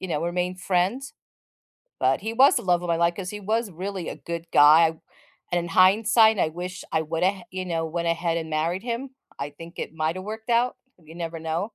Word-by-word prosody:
you 185 - -5
know, 150 -3 -1
remained 180 +1 -2
friends. 195 +10 0 0.9
But - - +2
he 220 +2 -3
was 265 +5 +6
the - - -2
love 180 -2 +2
of - - -4
my 170 - +3
life 170 0 +2
'cause 180 -1 -5
he 210 - -6
was 220 +2 -1
really 185 +1 -5
a - - -6
good 170 0 -6
guy, 155 +3 +7 0.6
and 175 - +2
in 175 - -4
hindsight 220 +4 +5
I - - +3
wish 180 +3 -7
I 160 - +1
went 165 +3 -1
ahea 190 -1 0
you 185 0 -4
know, 165 -2 -2
went 170 +1 -3
ahead 170 0 0
and 160 -1 -4
married 165 +4 -1
him. 245 +2 -4 0.3
I 140 +1 -4
think 165 +4 -12
it - - -5
might 160 +1 -1
have 185 - -7
worked 220 +2 -7
out. 240 +1 +2 0.2
You 160 0 -15
never 165 -1 -5
know. 160 +1 -2
175 Hz, 225 wpm, -25 LUFS, 165-200 Hz, 0.9 s, guy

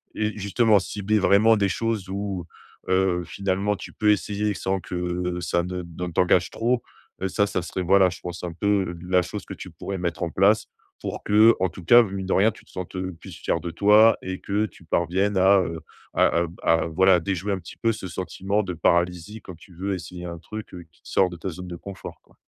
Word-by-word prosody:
et 110 0 -1
justement, 105 +1 +3
cibler 105 +2 -1
vraiment 105 +3 +5
des 100 -1 +1
choses 105 -1 -2
où, 100 -3 -4 0.4
heu, 95 -1 +2
finalement, 100 +3 -1
tu - - -10
peux 105 -1 +1
essayer 105 0 -1
sans 95 +3 -1
que 90 0 -3
ça 85 0 0
ne 90 0 -4
de 85 +1 -6
t'engage 90 +1 +3
trop, 120 +2 0 0.4
heu, 95 - 0
ça, 100 +2 +1
ça 100 -3 -2
serait, 90 +2 -4
voilà, 95 +1 +5
je 90 - -9
pense 90 0 -7
un 85 -1 -4
peu 95 0 0
la 90 0 +3
chose 85 - -6
que - - -7
tu - - -9
pourrais 95 -1 -6
mettre 85 -1 -2
en 85 - -2
place 100 +6 +3 0.4
pour - - -5
que, 110 +3 +6
en 95 - +1
tout 85 +1 -11
cas, 120 +6 +8
mine 95 -3 -5
de 95 - 0
rien, 105 +4 +4
tu - - -17
te - - -21
sentes, 95 0 -7
heu, 95 0 -3
plus - - -11
fier - - -1
de 85 - -5
toi 105 +5 +5
et 95 0 -4
que 105 +2 0
tu 95 - -13
parviennes 95 +5 0
à, 95 +1 +6
heu, 85 -2 -4 0.3
à - - +4 0.2
à 85 - -1 0.3
à, - - -1
voilà, 95 +2 +4
déjouer 95 +3 -2
un 95 - -2
petit 85 - -12
peu 115 - +1
ce 110 -4 -6
sentiment 95 +4 -2
de 90 -2 -4
paralysie 90 +5 0
quand 90 -2 -10
tu 85 +2 -17
veux 95 +3 -2
essayer 90 0 -8
un 85 -1 -6
truc 105 +7 -8 0.2
qui - - -30
te - - -16
sort 95 - +3
de 90 - -8
ta 95 - -4
zone 90 +1 -8
de 90 - -6
confort, 100 +3 -9
quoi. - - -27
95 Hz, 225 wpm, -24 LUFS, 90-100 Hz, 0.4 s, cas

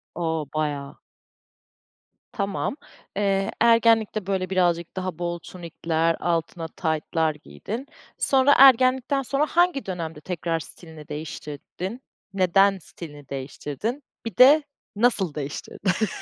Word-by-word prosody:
O, 160 -2 -1
baya. 145 -2 -3 1.3
Tamam. 200 +4 -2 0.4
Eee, 195 -1 +1
ergenlikte 225 -3 +4
böyle 190 -2 -1
birazcık 175 -3 +1
daha 185 -3 -4
bol 175 0 -2
tunikler, 165 -1 -2
altına 165 -1 -2
taytlar 160 -1 -1
giydin. 200 - -7 0.3
Sonra 270 +1 +4
ergenlikten 260 +1 +5
sonra 275 +3 0
hangi 345 -3 +2
dönemde 165 -5 -5
tekrar 165 -1 -2
stilini 160 -1 -11
değiştirdin? 155 - -7 0.3
Neden 195 +1 +4
stilini 145 -4 -11
değiştirdin, 145 - -5 0.2
bir 225 -5 -6
de 290 +4 +8 0.3
nasıl 205 -7 +2
değiştirdin? 180 +8 -2
180 Hz, 105 wpm, -24 LUFS, 160-225 Hz, 1.3 s, de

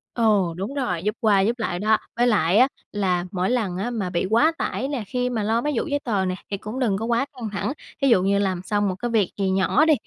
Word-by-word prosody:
Ồ, 205 -7 +2
đúng 195 +8 -4
rồi, 190 -12 -2
giúp 210 +2 -1
qua 205 -3 +4
giúp 230 +5 0
lại 175 -5 -2
đó. 215 +2 +3 0.2
Với 240 +1 +3
lại 190 -5 +3
á, 255 +3 +6 0.2
là 185 -4 0
mỗi 185 -1 -1
lần 220 -8 0
á, 205 +6 -2
mà 215 -7 -2
bị 175 0 -1
quá 235 +9 +4
tải 265 - -2
nè, 275 -6 -3
khi 250 +4 -1
mà 225 -4 -2
lo 225 +2 +1
mấy 295 +2 -1
vụ - - 0
giấy 285 -1 0
tờ 205 -6 0
nè 185 0 -1 0.2
thì 200 - -1
cũng 215 +5 -6
đừng 220 -7 +1
có 220 - -3
quá 235 +3 +1
căng 240 -5 -5
thẳng, 205 +5 -2 0.3
thí 275 - +3
dụ 230 -8 +5
như 200 +1 +2
làm 190 -3 0
xong 205 +1 0
một 185 - -2
cái 240 +5 -4
việc 215 -5 +2
gì 195 -1 0
nhỏ 190 +10 +3
đi, 315 - +5
215 Hz, 275 wpm, -23 LUFS, 190-240 Hz, 0.3 s, á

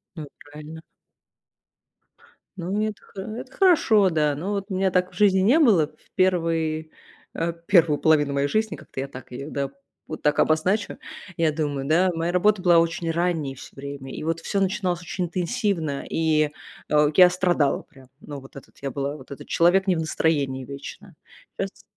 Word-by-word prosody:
Ну 155 - -6
и - - -11 0.2
правильно. 155 +2 -10 1.7
Ну 190 +4 -2
это 215 -1 -3
хо 195 - -10
это 235 +6 -7
хорошо, 225 - +4
да. 150 -2 +1
Ну 175 +8 -4
вот 200 -1 -2
у 190 - -4
меня 190 0 +1
так 180 0 0
в - - -17
жизни 195 -3 +4
не 240 +12 +4
было. 195 - +4
В 155 - -27
1, 165 -4 0 0.4
э, 165 +1 -1
1 170 -7 +4
половину 145 -2 +3
моей 140 0 +1
жизни, 215 +3 0
как-то 130 - -8
я 135 - -4
так 130 -2 -11
ее, 140 +4 -7
да, 140 -1 -2 0.4
вот 155 - -7
так 150 0 +2
обозначу, 185 +7 +1 0.4
я 160 -2 +2
думаю, 145 -3 -2
да, 180 +4 +3
моя 165 +1 -2
работа 205 +2 +3
была 175 -2 +5
очень 165 0 -1
ранней 165 -5 -1
всё 130 - -13
время, 140 -1 -7
и - - -6
вот 165 0 -1
всё 200 - -2
начиналось 185 -2 0
очень 180 +1 -3
интенсивно, 175 - -2
и, 155 -2 +2 0.4
а, 150 0 +4
я 180 -1 +8
страдала 175 -6 +1
прям. 130 -2 -19
Ну 145 -3 -8
вот 135 +1 -16
этот 140 - -13
я 140 - -2
была, 140 +2 -3
вот 130 -1 -15
этот 140 - -9
человек 185 +3 +3
не 185 - +3
в 160 - -1
настроении 140 -5 0
вечно. 140 +1 -10 0.5
Щас - - -5
165 Hz, 185 wpm, -24 LUFS, 145-185 Hz, 1.7 s, я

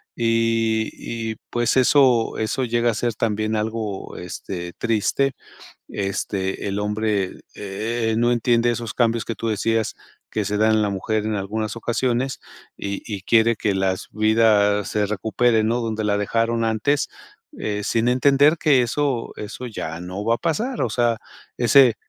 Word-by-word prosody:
Y 115 -1 +1 0.4
y 110 - -8
pues 120 -1 +1
eso 130 -3 +4
eso 110 +4 -1
llega 120 0 +1
a - - -4
ser 115 +1 -1
también 110 0 -1
algo, 110 -2 -3
este, 90 0 -6
triste. 115 +5 +1 0.6
Este, 95 -1 -3
el 100 +1 -2
hombre, 105 -2 -1
eh, 110 +3 -2
no 120 +1 +3
entiende 120 0 +2
esos 115 -2 -4
cambios 115 -2 +2
que 115 - -4
tú 115 - -3
decías 110 +1 0 0.4
que 105 - -1
se 105 +1 -1
dan 110 +1 +4
en 110 - +3
la 105 - +1
mujer 105 +2 -1
en 110 -1 -1
algunas 105 +2 -3
ocasiones, 120 +2 -1 0.4
y 100 0 -5
y 100 -3 -5
quiere 115 +3 +3
que 105 -1 -1
las 95 -1 -1
vidas 105 -2 +3
se 105 -1 +1
recuperen, 110 +2 +1
¿no?, 120 +2 0
donde 110 -1 -2
la 100 -1 +2
dejaron 115 +3 0
antes, 115 +6 +1 0.5
eh, 105 -1 -2
sin 115 +3 +1
entender 140 +5 +4
que 145 -5 +4
eso 125 0 -1
eso 115 +4 -6
ya 85 -7 -5
no 90 +3 -6
va 115 +1 +3
a - - -7
pasar, 225 - -1
o 120 - +1
sea, 120 0 +1 0.4
ese 125 0 +6
110 Hz, 160 wpm, -22 LUFS, 105-120 Hz, 0.6 s, ese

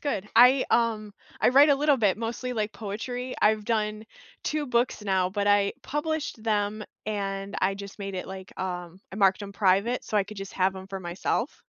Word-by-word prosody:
good, 210 -8 -2
I, 250 +3 +7
um 220 -3 +1 0.3
I - - +5
write 285 +3 +7
a - - +6
little 290 -1 +3
bit, 210 -3 +2
mostly 235 +2 -3
like 215 -2 -2
poetry; 245 +4 -5
I've 215 0 +3
done 215 -1 -1 0.4
2 300 -1 -1
books 240 -3 0
now, 190 -2 +1
but 205 +1 -1
I 205 -1 +4
published 295 -4 -3
them 210 -1 0 0.2
and 195 -2 -3
I 195 +1 +2
just 200 +1 -9
made 195 -1 -5
it, 180 - -4
like, 190 -1 -9
um 180 -1 -5
I - - -6
marked 195 -1 +3
them 200 -1 -7
private 200 +5 +2
so 215 - -2
I 200 - +3
could 215 +1 -10
just 195 0 -7
have 190 0 +1
'em 190 - -8
for 195 -1 -5
myself. 185 - -2
210 Hz, 200 wpm, -27 LUFS, 195-235 Hz, 0.4 s, I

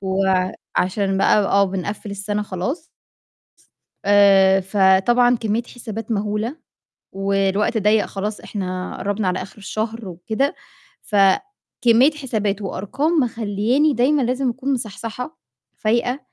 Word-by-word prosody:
وعشان 190 0 0
بقى 205 - +4
آه 200 0 +3
بنقفِّل 195 +2 -4
السنة 205 +1 -3
خلاص 230 - -4 1.2
آآ، 195 -1 +5
فطبعًا 200 +6 +3
كمية 225 0 -1
حسابات 225 -2 -8
مهولة، 210 +6 -2 0.6
والوقت 195 +2 0
ضيّق 210 0 +3
خلاص 205 +2 -4
إحنا 185 -3 -5
قرّبنا 205 0 -1
على 180 0 -1
آخر 195 - -10
الشهر 215 +2 -4
وكده، 220 - -2 0.5
فكمية 235 - +2
حسابات 220 -9 -2
وأرقام 205 - -2
مخلّياني 235 +6 +1
دايمًا 275 +4 +2
لازم 255 +1 0
أكون 270 +3 -2
مصحصحة، 230 +4 -5 0.4
فايقة، 240 +4 0
210 Hz, 105 wpm, -21 LUFS, 195-240 Hz, 1.2 s, آآ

